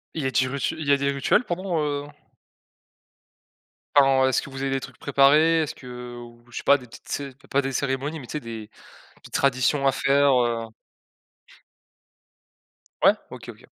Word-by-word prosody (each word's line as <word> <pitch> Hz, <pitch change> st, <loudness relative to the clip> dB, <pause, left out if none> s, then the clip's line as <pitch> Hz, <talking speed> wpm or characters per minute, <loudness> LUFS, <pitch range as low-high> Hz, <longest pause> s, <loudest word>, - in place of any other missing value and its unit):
Il 155 Hz, -4 st, -2 dB
a 130 Hz, -, -2 dB
dit 130 Hz, -, +2 dB
rutu 135 Hz, +1 st, -2 dB
il 155 Hz, -, -5 dB
y -, -, +4 dB
a 140 Hz, -, +5 dB
des 140 Hz, 0 st, 0 dB
rituels, 140 Hz, -, +2 dB
pendant, 180 Hz, -4 st, -2 dB
heu 145 Hz, -1 st, -2 dB, 1.9 s
Enfin, 135 Hz, -2 st, +5 dB
est-ce 130 Hz, -, +1 dB
que -, -, -9 dB
vous 135 Hz, 0 st, -7 dB
avez 135 Hz, -, -1 dB
des 135 Hz, -, 0 dB
trucs -, -, -11 dB
préparés? 150 Hz, +4 st, +4 dB
Est-ce 155 Hz, -, -3 dB
que, -, -, -15 dB
heu, 125 Hz, -1 st, -8 dB
ou 120 Hz, 0 st, -12 dB
je 120 Hz, -, -9 dB
sais -, -, -4 dB
pas 140 Hz, 0 st, +5 dB
des 125 Hz, -, -13 dB
petites -, -, -15 dB
cé 140 Hz, -1 st, -4 dB
p 135 Hz, -, -23 dB
pas 140 Hz, -, +1 dB
des 135 Hz, 0 st, -3 dB
cérémonies, 140 Hz, +4 st, -2 dB
mais 130 Hz, -, -10 dB
tu -, -, -11 dB
sais? 150 Hz, -, -2 dB
Des 115 Hz, -5 st, -8 dB, 0.5 s
petites -, -, -15 dB
traditions 140 Hz, +1 st, +2 dB
à 135 Hz, -, +4 dB
faire, 140 Hz, +1 st, +3 dB
heu 115 Hz, -1 st, -2 dB, 2.4 s
Ouais. -, -, +7 dB, 0.2 s
OK, -, -, -10 dB
OK. -, -, -12 dB
135 Hz, 195 wpm, -24 LUFS, 130-145 Hz, 2.4 s, Ouais